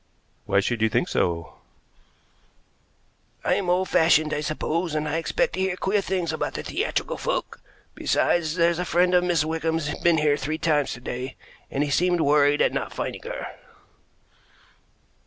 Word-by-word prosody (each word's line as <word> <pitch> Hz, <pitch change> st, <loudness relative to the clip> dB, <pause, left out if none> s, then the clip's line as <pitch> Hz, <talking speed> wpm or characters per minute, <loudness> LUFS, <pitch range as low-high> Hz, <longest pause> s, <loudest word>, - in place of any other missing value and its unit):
"Why 100 Hz, 0 st, +3 dB
should 115 Hz, +2 st, -2 dB
you 110 Hz, -, +3 dB
think -, -, 0 dB
so?" 85 Hz, -1 st, -1 dB, 1.9 s
"I'm 185 Hz, -3 st, +1 dB
old 185 Hz, +1 st, +2 dB
fashioned, 155 Hz, -1 st, +3 dB
I 150 Hz, -, -1 dB
suppose, 155 Hz, +2 st, -2 dB
and 155 Hz, 0 st, -1 dB
I 150 Hz, +2 st, -1 dB
expect 475 Hz, -, 0 dB
to -, -, -4 dB
hear 190 Hz, -1 st, 0 dB
queer 200 Hz, +2 st, +1 dB
things 180 Hz, -4 st, -2 dB
about -, -, -3 dB
theatrical -, -, -2 dB
folk; -, -, -3 dB, 0.3 s
besides, 160 Hz, -2 st, +1 dB
there's 170 Hz, -1 st, +2 dB
a -, -, 0 dB
friend 180 Hz, +1 st, +2 dB
of 180 Hz, 0 st, +4 dB
Miss 170 Hz, -4 st, +1 dB
Wickham's 160 Hz, -1 st, -1 dB
been 170 Hz, -1 st, +3 dB
here 150 Hz, -1 st, +2 dB
three 155 Hz, +3 st, -3 dB
times 150 Hz, -3 st, +1 dB
to 125 Hz, -, -10 dB
day, 125 Hz, +2 st, -5 dB, 0.3 s
and 140 Hz, -, 0 dB
he 145 Hz, -, -2 dB
seemed 175 Hz, +3 st, +2 dB
worried 145 Hz, 0 st, +4 dB
at -, -, +1 dB
not -, -, -3 dB
finding -, -, -4 dB
her." -, -, -6 dB
160 Hz, 160 wpm, -24 LUFS, 145-175 Hz, 1.9 s, of